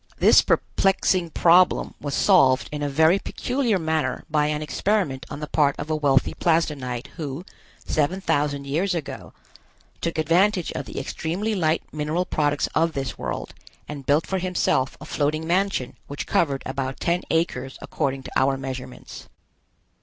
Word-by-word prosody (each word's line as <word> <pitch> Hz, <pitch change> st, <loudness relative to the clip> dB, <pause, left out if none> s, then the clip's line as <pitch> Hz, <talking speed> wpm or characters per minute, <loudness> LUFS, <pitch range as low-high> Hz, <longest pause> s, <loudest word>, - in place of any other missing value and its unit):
This -, -, +6 dB
perplexing 185 Hz, -2 st, +1 dB
problem 175 Hz, +3 st, +4 dB
was 145 Hz, -1 st, -3 dB
solved 135 Hz, -10 st, +4 dB
in 150 Hz, -1 st, -4 dB
a 145 Hz, -, -1 dB
very 160 Hz, +6 st, +4 dB
peculiar 245 Hz, -3 st, -1 dB
manner 160 Hz, -6 st, -1 dB
by 150 Hz, -1 st, +2 dB
an 150 Hz, 0 st, -2 dB
experiment 160 Hz, -4 st, -1 dB
on 145 Hz, -, -7 dB
the 150 Hz, -, -4 dB
part 145 Hz, -2 st, +2 dB
of 155 Hz, +2 st, -5 dB
a -, -, +2 dB
wealthy 140 Hz, -3 st, +2 dB
Plasdenite, 145 Hz, -7 st, 0 dB
who, 150 Hz, +1 st, -5 dB, 0.4 s
seven 155 Hz, +5 st, 0 dB
thousand 145 Hz, -6 st, 0 dB
years 175 Hz, +7 st, 0 dB
ago, 155 Hz, -4 st, -6 dB, 0.7 s
took 165 Hz, -1 st, -2 dB
advantage 175 Hz, +4 st, +2 dB
of 135 Hz, +1 st, -5 dB
the -, -, -5 dB
extremely 175 Hz, +10 st, -3 dB
light 160 Hz, -5 st, +1 dB
mineral 155 Hz, +4 st, -1 dB
products 145 Hz, -3 st, 0 dB
of 165 Hz, 0 st, +2 dB
this 135 Hz, -4 st, -4 dB
world -, -, -4 dB, 0.3 s
and 140 Hz, -3 st, -8 dB
built 145 Hz, +3 st, +3 dB
for 190 Hz, -, -2 dB
himself 175 Hz, -7 st, 0 dB
a -, -, -9 dB
floating 155 Hz, +2 st, -1 dB
mansion 180 Hz, -6 st, 0 dB
which 145 Hz, -, -5 dB
covered 140 Hz, -5 st, 0 dB
about 130 Hz, 0 st, -3 dB
ten 175 Hz, +1 st, 0 dB
acres 135 Hz, -5 st, -1 dB
according 135 Hz, -1 st, -3 dB
to -, -, -9 dB
our 135 Hz, 0 st, +2 dB
measurements. 130 Hz, -1 st, -8 dB
155 Hz, 155 wpm, -24 LUFS, 140-175 Hz, 0.7 s, This